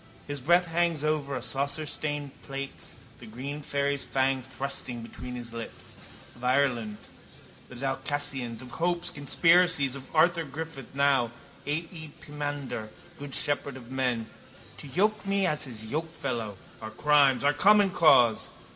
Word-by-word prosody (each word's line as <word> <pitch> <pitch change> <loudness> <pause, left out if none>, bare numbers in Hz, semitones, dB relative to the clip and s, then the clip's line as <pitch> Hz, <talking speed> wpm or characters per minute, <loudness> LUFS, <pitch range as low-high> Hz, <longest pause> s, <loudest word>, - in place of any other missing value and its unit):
His 145 -1 -5
breath 175 +6 +4
hangs 170 -2 +1
over 150 -3 0
our 125 - -3
saucestained 145 +2 -2
plates, 135 0 -7 0.2
the - - -11
green 135 +7 -6
fairy's 140 -1 0
fang 135 0 +1
thrusting 130 -2 -5
between 125 +2 -8
his 120 -1 -6
lips. 115 -1 -8 0.4
Of 120 - -15
Ireland, 125 -5 +1 0.7
the 125 - -11
Dalcassians, 135 -2 -1
of 125 - -11
hopes, 175 +1 -1
conspiracies, 165 -1 +3
of 135 -1 -9
Arthur 170 +1 +4
Griffith 150 -2 -7
now, 140 -4 +3 0.4
A - - 0 0.2
E, 160 -4 -9
pimander, 145 -6 -5 0.3
good 140 -1 -3
shepherd 145 -2 0
of 125 -1 -12
men. 125 -4 0 0.5
To - - -9
yoke 210 +9 +1
me 195 -1 +1
as 150 -4 0
his 110 -4 -8
yokefellow, 120 - -3 0.2
our 110 - -5
crimes 140 +2 +4
our 145 +1 +4
common 200 +5 +6
cause. 125 -10 +5
140 Hz, 140 wpm, -28 LUFS, 125-155 Hz, 0.7 s, common